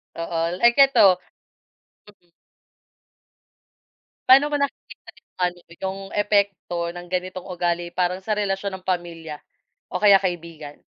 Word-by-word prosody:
Oo, 165 Hz, 0 st, -3 dB, 0.2 s
like 240 Hz, +3 st, +5 dB
eto 200 Hz, -9 st, +6 dB, 0.9 s
Mm. 195 Hz, -4 st, -22 dB, 2.0 s
Paano 275 Hz, +3 st, +7 dB
mo 290 Hz, -, 0 dB
nakikita 280 Hz, -1 st, -5 dB
'yung -, -, -67 dB
ano 175 Hz, 0 st, -4 dB
'yung 190 Hz, +3 st, -5 dB, 0.2 s
epekto 200 Hz, -4 st, 0 dB
ng 175 Hz, +1 st, -9 dB
ganitong 185 Hz, 0 st, -3 dB
ugali 175 Hz, -1 st, -2 dB
parang 180 Hz, +1 st, -1 dB
sa 215 Hz, -, 0 dB
relasyon 200 Hz, -1 st, -2 dB
ng -, -, -37 dB
pamilya 165 Hz, -4 st, -4 dB, 0.5 s
o -, -, -4 dB
kaya 200 Hz, -2 st, +6 dB
kaibigan? 165 Hz, -5 st, -5 dB
185 Hz, 120 wpm, -23 LUFS, 175-200 Hz, 2.0 s, Paano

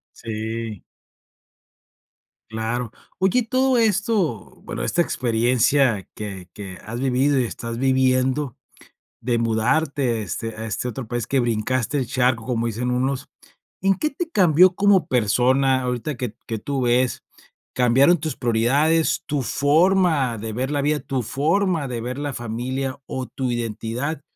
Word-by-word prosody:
Sí. 110 Hz, -1 st, -5 dB, 1.7 s
Claro. 115 Hz, +1 st, -3 dB, 0.3 s
Oye, 205 Hz, +6 st, +3 dB
todo 255 Hz, +2 st, +2 dB
esto, 205 Hz, -, 0 dB
bueno, -, -, -5 dB
esta 175 Hz, -, +1 dB
experiencia 120 Hz, -, +2 dB
que 95 Hz, -4 st, -7 dB
que 95 Hz, -3 st, -8 dB
has 115 Hz, +3 st, -5 dB
vivido, 135 Hz, +1 st, +2 dB
y 125 Hz, -, +1 dB
estás 115 Hz, 0 st, -5 dB
viviendo, 130 Hz, 0 st, +1 dB, 0.6 s
de 120 Hz, 0 st, 0 dB
mudarte, 115 Hz, +2 st, +1 dB
este, 105 Hz, +4 st, -4 dB
a 110 Hz, +1 st, -5 dB
este 110 Hz, +3 st, -3 dB
otro 125 Hz, -1 st, -6 dB
país, 120 Hz, -1 st, -2 dB
que 135 Hz, -, +1 dB
brincaste 120 Hz, +3 st, 0 dB
el 130 Hz, -, -1 dB
charco, 125 Hz, -2 st, +1 dB
como 115 Hz, -2 st, -1 dB
dicen 120 Hz, +2 st, -2 dB
unos, 130 Hz, +2 st, -1 dB, 0.5 s
¿en 195 Hz, +1 st, +3 dB
qué 305 Hz, +8 st, -1 dB
te 335 Hz, +4 st, -4 dB
cambió 180 Hz, -, +5 dB
como 195 Hz, -5 st, +4 dB
persona 130 Hz, +2 st, +2 dB
ahorita 125 Hz, +3 st, -3 dB
que 120 Hz, -4 st, -4 dB
que 110 Hz, -2 st, -3 dB
tú 135 Hz, +3 st, -3 dB
ves? 125 Hz, +1 st, +1 dB, 0.5 s
¿Cambiaron 135 Hz, +7 st, +4 dB
tus 155 Hz, -3 st, -4 dB
prioridades, 140 Hz, +8 st, +2 dB
tu 145 Hz, -3 st, -1 dB
forma 155 Hz, -3 st, +2 dB
de 110 Hz, +1 st, -5 dB
ver 130 Hz, +5 st, -2 dB
la 145 Hz, -1 st, 0 dB
vida, 150 Hz, +1 st, +1 dB
tu 130 Hz, -2 st, -2 dB
forma 160 Hz, -, 0 dB
de 120 Hz, -2 st, -4 dB
ver 125 Hz, +4 st, -5 dB
la 145 Hz, -1 st, -3 dB
familia, 130 Hz, +4 st, -4 dB
o 130 Hz, -1 st, -4 dB
tu 130 Hz, 0 st, -3 dB
identidad? 120 Hz, +6 st, -3 dB
130 Hz, 145 wpm, -22 LUFS, 115-145 Hz, 1.7 s, cambió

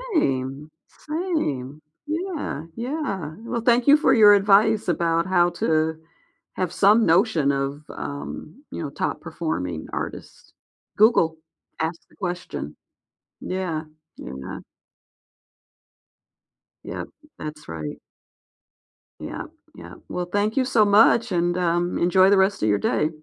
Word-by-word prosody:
Same, 135 Hz, -, -1 dB, 0.2 s
same. 230 Hz, -, -3 dB, 0.2 s
Yeah, 315 Hz, -, -4 dB
yeah. 230 Hz, -, -4 dB
Well, 235 Hz, +1 st, -4 dB
thank 240 Hz, +2 st, +3 dB
you 290 Hz, -, +8 dB
for 300 Hz, -, +3 dB
your 210 Hz, -3 st, +8 dB
advice 205 Hz, +1 st, +4 dB
about 170 Hz, -1 st, +1 dB
how 175 Hz, -2 st, +3 dB
to 160 Hz, -1 st, 0 dB, 0.5 s
have 185 Hz, -3 st, -2 dB
some 210 Hz, +4 st, +5 dB
notion 165 Hz, -4 st, +3 dB
of, 140 Hz, +2 st, -3 dB
um, 150 Hz, -, -7 dB
you -, -, -5 dB
know, 150 Hz, -, -4 dB
top 140 Hz, -, -3 dB
performing 90 Hz, -, -4 dB
artists. -, -, -7 dB, 0.4 s
Google, 185 Hz, -7 st, +4 dB, 0.4 s
ask 165 Hz, +1 st, -2 dB
the -, -, -23 dB
question. 175 Hz, -, -5 dB, 0.7 s
Yeah, 180 Hz, -4 st, -3 dB, 0.3 s
yeah. 65 Hz, +1 st, -7 dB, 2.2 s
Yep, -, -, -6 dB, 0.3 s
that's 150 Hz, 0 st, -8 dB
right. 80 Hz, -2 st, -6 dB, 1.2 s
Yep, -, -, -6 dB, 0.3 s
yep, -, -, -11 dB, 0.2 s
well, 180 Hz, -, -3 dB
thank 205 Hz, +5 st, -1 dB
you 260 Hz, -, +3 dB
so 235 Hz, -4 st, +3 dB
much, 220 Hz, +2 st, +5 dB
and, 175 Hz, 0 st, +1 dB
um, 175 Hz, 0 st, 0 dB
enjoy 185 Hz, +2 st, +4 dB
the 200 Hz, -, +5 dB
rest 190 Hz, -, +2 dB
of 110 Hz, -, +3 dB
your 105 Hz, -1 st, +2 dB
day. 150 Hz, +9 st, +1 dB
175 Hz, 120 wpm, -23 LUFS, 155-215 Hz, 2.2 s, you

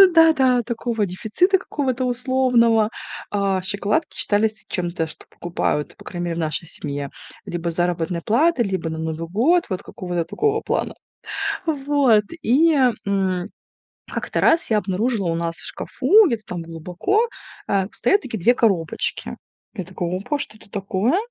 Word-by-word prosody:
Да-да, 270 Hz, -7 st, +5 dB
такого 230 Hz, -2 st, -1 dB
дефицита 220 Hz, -, +1 dB
какого-то 265 Hz, -8 st, -2 dB
условного. 245 Hz, -3 st, +3 dB, 0.4 s
А, 195 Hz, -2 st, +1 dB
шоколадки 205 Hz, -, 0 dB
считались 215 Hz, +1 st, 0 dB
чем-то, 175 Hz, -3 st, -1 dB
что 150 Hz, 0 st, -11 dB
покупают, 170 Hz, -3 st, -2 dB
по -, -, -15 dB
крайней 175 Hz, -1 st, -4 dB
мере, 170 Hz, -1 st, -2 dB
в -, -, -2 dB
нашей 160 Hz, +1 st, -1 dB
семье. 145 Hz, -4 st, -3 dB, 0.4 s
Либо 175 Hz, 0 st, -3 dB
с 165 Hz, -, -5 dB
заработной 175 Hz, -1 st, -1 dB
платы, 265 Hz, -, +3 dB
либо 190 Hz, -5 st, -2 dB
на 160 Hz, -, -4 dB
Новый 160 Hz, +1 st, -3 dB
год. 285 Hz, -, +3 dB
Вот 185 Hz, -3 st, -3 dB
какого-то 175 Hz, -2 st, -4 dB
такого 430 Hz, -, 0 dB
плана. -, -, -1 dB, 0.7 s
Вот. 280 Hz, -7 st, +3 dB, 0.2 s
И, 310 Hz, +7 st, +4 dB, 0.3 s
м, 190 Hz, -3 st, 0 dB, 0.7 s
как-то -, -, -2 dB
раз 330 Hz, -5 st, +3 dB
я 215 Hz, -, +4 dB
обнаружила 205 Hz, +1 st, 0 dB
у 165 Hz, -, 0 dB
нас 165 Hz, 0 st, -2 dB
в -, -, -5 dB
шкафу, 430 Hz, +1 st, +3 dB
где-то 235 Hz, -8 st, -1 dB
там 175 Hz, -2 st, -5 dB
глубоко, 180 Hz, -, -1 dB, 0.4 s
а, 195 Hz, -1 st, +2 dB
стоят 400 Hz, -, +2 dB
такие 230 Hz, -4 st, -5 dB
2 235 Hz, +8 st, +4 dB
коробочки. 195 Hz, -10 st, 0 dB, 0.4 s
Я 190 Hz, -, -4 dB
такая: 175 Hz, -1 st, -4 dB
опа, 285 Hz, +10 st, -2 dB
что 215 Hz, -, -6 dB
это 215 Hz, -, -18 dB
такое? 200 Hz, -, 0 dB
205 Hz, 150 wpm, -22 LUFS, 175-255 Hz, 0.7 s, Да-да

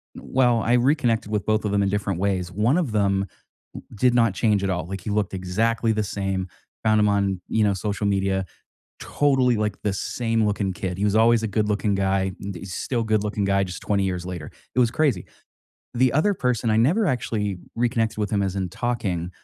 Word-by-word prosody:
well, 120 Hz, -3 st, +1 dB
I 120 Hz, -, +1 dB
reconnected 120 Hz, -4 st, +2 dB
with 105 Hz, -2 st, -1 dB
both 110 Hz, 0 st, +1 dB
of 100 Hz, -, 0 dB
them 100 Hz, 0 st, +2 dB
in 100 Hz, -, +1 dB
different 100 Hz, -3 st, -1 dB
ways, 95 Hz, -2 st, -1 dB
one 110 Hz, -, +2 dB
of 160 Hz, -10 st, 0 dB
them 100 Hz, -2 st, +1 dB, 0.5 s
w -, -, -10 dB
did 125 Hz, +3 st, +3 dB
not 115 Hz, -5 st, +3 dB
change 105 Hz, -3 st, +1 dB
at 95 Hz, -, 0 dB
all. 90 Hz, -3 st, -2 dB
Like, 95 Hz, +1 st, -5 dB
he 100 Hz, -, -5 dB
looked 105 Hz, 0 st, 0 dB
exactly 110 Hz, +5 st, 0 dB
the 110 Hz, 0 st, 0 dB
same, 95 Hz, -2 st, -3 dB, 0.4 s
found 110 Hz, -1 st, +4 dB
him 105 Hz, -, +3 dB
on, 100 Hz, -2 st, +1 dB
you 110 Hz, -, +2 dB
know, 100 Hz, -, +3 dB
social 100 Hz, +1 st, -3 dB
media, 95 Hz, -1 st, 0 dB, 0.6 s
totally, 130 Hz, -4 st, +2 dB
like, 105 Hz, -2 st, -2 dB
the 105 Hz, -, 0 dB
same 115 Hz, +3 st, -1 dB
looking 100 Hz, -2 st, 0 dB
kid. 90 Hz, -1 st, -4 dB
He -, -, -1 dB
was 105 Hz, 0 st, +2 dB
always 115 Hz, +1 st, +5 dB
a -, -, 0 dB
good 105 Hz, +1 st, 0 dB
looking 105 Hz, -1 st, 0 dB
guy, 95 Hz, 0 st, 0 dB
and 100 Hz, 0 st, -5 dB
he's 90 Hz, +2 st, -8 dB
still 120 Hz, -3 st, -1 dB
good 110 Hz, -2 st, +1 dB
looking 105 Hz, -1 st, -2 dB
guy 100 Hz, 0 st, +2 dB
just 90 Hz, -, -7 dB
20 100 Hz, -1 st, 0 dB
years 90 Hz, -2 st, -3 dB
later, 90 Hz, -5 st, -6 dB, 0.2 s
it -, -, +2 dB
was 120 Hz, -2 st, +4 dB
crazy. 135 Hz, -, +1 dB, 0.7 s
The 125 Hz, 0 st, +2 dB
other 160 Hz, +9 st, +3 dB
person, 125 Hz, -, 0 dB
I 110 Hz, -, +3 dB
never 170 Hz, -, +3 dB
actually 110 Hz, -, -1 dB, 0.2 s
reconnected 115 Hz, -2 st, 0 dB
with 105 Hz, -2 st, -1 dB
him 100 Hz, -, +1 dB
as 95 Hz, -1 st, -1 dB
in 95 Hz, -2 st, -2 dB
talking, 95 Hz, -6 st, -2 dB
105 Hz, 215 wpm, -23 LUFS, 95-115 Hz, 0.7 s, always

